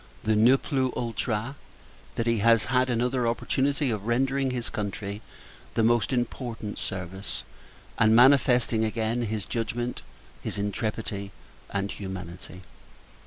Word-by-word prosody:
the 110 0 +2
"Ne 120 +5 +6
plus 130 -2 0
ultra!" 115 +1 -2 0.6
that 115 - -1
he 115 -2 +2
has 115 +1 +5
had 130 0 +2
another 125 +1 +1
opportunity 135 +3 +1
of 105 -1 -3
rendering 135 +3 +1
his 125 -2 -3
country 100 -1 -4 0.5
the 115 - +3
most 120 0 +3
important 120 -3 -3
service; 95 +1 -5 0.6
and 110 +1 +5
manifesting, 125 -3 +5
again, 110 +2 0
his 110 -3 -2
judgment, 120 +1 -3 0.4
his - - -4
intrepidity, 100 -1 -3 0.4
and 100 0 -2
humanity. 95 -1 -7
115 Hz, 120 wpm, -27 LUFS, 105-125 Hz, 0.6 s, Ne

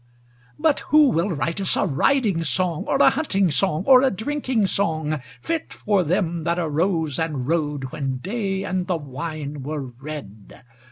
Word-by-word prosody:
But 305 -1 +2
who 300 -3 +6
will 170 +2 +1
write 165 +2 -2
us 190 - +1
a - - +2
riding 190 - +1
song, 165 +3 0
Or - - +1
a - - +7
hunting 200 - +1
song 160 +1 +1
or 260 -2 +7
a 270 - +4
drinking 255 0 -1
song, 160 -6 -1 0.2
Fit 330 -1 -3
for 205 -3 +1
them 170 -1 -1
that 170 +1 0
arose 160 -2 0
and 150 -6 -2
rode 145 -5 -1
When 135 -3 -3
day 195 - -3
and 185 -1 -2
the 180 -3 0
wine 145 0 -6
were 150 +2 -4 0.2
red? 135 -10 -9
170 Hz, 165 wpm, -23 LUFS, 150-200 Hz, 0.2 s, a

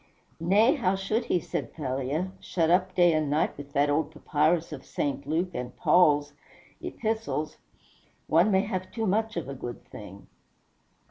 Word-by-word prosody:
"Nay, 205 - +4
how 195 - +1
should 215 +5 -1
he," 180 - +1
said - - -5
Thalia, 140 +5 -2
"shut 165 -2 0
up 185 +1 +2
day 175 -2 +5
and 155 -2 0
night 150 +2 +1
with 145 0 -10
that 145 +1 +3
old 145 +1 +1
papyrus 155 +1 0
of 135 - -8
St. 140 -1 -3
Luke 170 +4 0
and 125 -2 -5
Paul's 145 -5 +4 0.5
Epistles? 220 -9 -3 0.7
One 170 +6 +4
may 190 -2 +4
have 185 -3 -4
too 225 -1 -2
much 215 +1 0
of 170 - -3
a 140 - -5
good 120 -2 -7
thing." 100 -1 -11
165 Hz, 160 wpm, -27 LUFS, 145-190 Hz, 0.7 s, day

